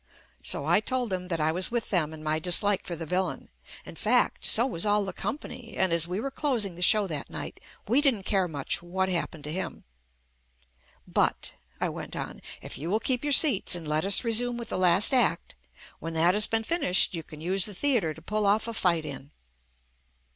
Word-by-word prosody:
So 140 - -2
I 170 +5 +4
told 245 +1 -3
them 180 -1 -3
that 165 -3 -2
I 155 +1 +1
was 180 +3 +1
with 235 -1 -3
them 165 -6 +1
in 155 -1 -10
my 155 0 0
dislike 185 +4 0
for 175 - -4
the 165 0 -6
vil 185 +4 0
lain, - - -8 0.2
— - - -17
in - - -10
fact, - - +1
so 235 +1 +6
was 170 -11 -2
all 205 -1 +2
the 190 - -5
company, 230 +2 -6
and 185 -3 +1
as 170 0 +2
we 180 +3 -3
were 270 +4 -4
closing 245 - -1
the 175 - -11
show 210 +3 +6
that 155 -6 -5
night - - -7 0.3
we 250 +7 +3
didn't 255 -9 +1
care 190 -2 +1
much 150 +1 -1
what 190 +2 -2
happened 170 -4 -3
to 150 - -5
him. 190 - -5 1.2
But - - -1
— - - -36
I - - 0
went - - -7
on - - -6
— - - -15
if - - -6
you 160 +4 -4
will 215 +4 +1
keep 250 +2 -1
your 290 - -1
seats 270 - +5
and 165 -3 -7
let 150 +1 0
us 195 0 +5
resume 240 +1 +1
with 235 -2 -7
the - - -2
last 185 +7 +4
act, 255 - +1 0.5
when 165 0 -6
that 170 +3 +4
has 210 +1 +4
been 225 0 -1
JUST 225 - -9
ME 340 - +3
finished 185 - +3
you 165 - -4
can 155 -1 -13
use 185 +4 0
the 210 - -6
theatre 210 - +1
to - - -15
pull 210 -1 -1
off 215 +3 +2
a 230 - -4
fight 170 -6 +1
in. 140 -1 -8
190 Hz, 235 wpm, -27 LUFS, 170-225 Hz, 1.2 s, so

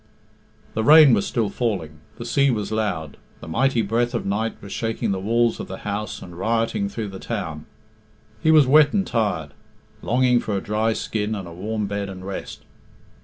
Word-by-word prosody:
The 110 - -1
rain 150 0 +8
was 100 -3 +2
still 115 -4 0
falling, 90 -11 -3 0.2
the 120 - -7
sea 140 +4 +2
was 110 -5 -1
loud, 95 -9 -2 0.2
the - - -10
mighty 120 +6 +1
breath 120 +4 0
of 115 - -2
night 105 +3 -1
was 100 - -11
shaking 115 -1 -2
the 95 - -1
walls 115 +4 +1
of - - -5
the - - -6
house 105 0 -4
and 90 -1 -11
rioting 115 - 0
through 110 - -5
the 95 -1 -8
town. 80 -9 -5 0.7
He - - +2
was 155 -3 +7
wet 145 +2 +5
and 195 -2 +1
tired, 90 - -1 0.5
longing 125 +1 +3
for 105 -4 -2
a - - 0
dry 110 +3 0
skin 110 0 -2
and 95 -4 -6
a 85 - -9
warm 105 +4 -3
bed 100 0 -3
and 95 -1 -8
rest. 100 0 -6
110 Hz, 190 wpm, -23 LUFS, 100-120 Hz, 0.7 s, rain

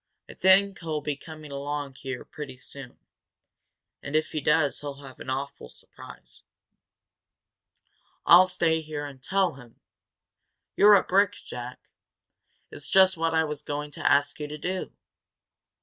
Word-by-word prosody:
I - - -11
think 190 +1 +4
he'll 155 -3 -3 0.2
come 155 -1 -10
along 145 0 -4
here 130 -1 -7
pretty 140 -4 -8
soon. 130 0 -11 1.0
And, 140 +1 -5
if 155 0 +1
he 155 - -2
does, 150 -1 +2
he'll 145 -1 -7
have 130 -2 -12
an - - -8
awful 135 - -4
surprise." - - -12 1.8
"I'll 180 +2 +8
stay 165 -3 +1
here 150 -1 -5
and 135 -2 -10
tell 190 +4 +1
him 120 -3 -16 0.5
" - - -56
"You're 210 0 +8
a 195 - +4
brick, 200 +1 +3
Jack! 125 +1 -9 0.8
It's - - -7
just 190 0 +5
what 165 0 0
I 160 - +4
was 150 -2 -4
going 145 0 -5
to - - 0
ask 145 +1 +2
you 150 - -4
to 150 +1 -7
do. 185 +4 -4
150 Hz, 150 wpm, -26 LUFS, 140-170 Hz, 1.8 s, I'll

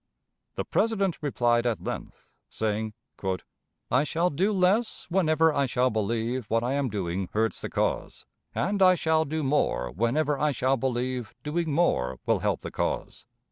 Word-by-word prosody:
The - - -2
President 200 -5 +1
replied 120 -4 +2
at 115 -3 -1
length, - - -6 0.2
saying: 110 0 -2 1.0
"I - - +4
shall 170 +4 0
do 185 +9 +1
less 200 +4 +1
whenever 160 -3 +3
I 140 -1 +1
shall 125 +1 +2
believe 115 +3 -1
what 115 +1 +1
I 125 +2 0
am 140 -2 0
doing 95 -3 -2
hurts 110 -2 0
the - - -4
cause, - - -2 0.3
and 200 +2 0
I 185 -1 +7
shall 160 -1 +2
do 155 +1 -2
more 130 - +1
whenever 140 - +1
I 150 -1 +2
shall 130 +2 +2
believe 125 -2 -2
doing 160 +2 -1
more 65 - +1
will - - +2
help - - 0
the - - -6
cause. - - -3
135 Hz, 160 wpm, -27 LUFS, 115-160 Hz, 1.0 s, I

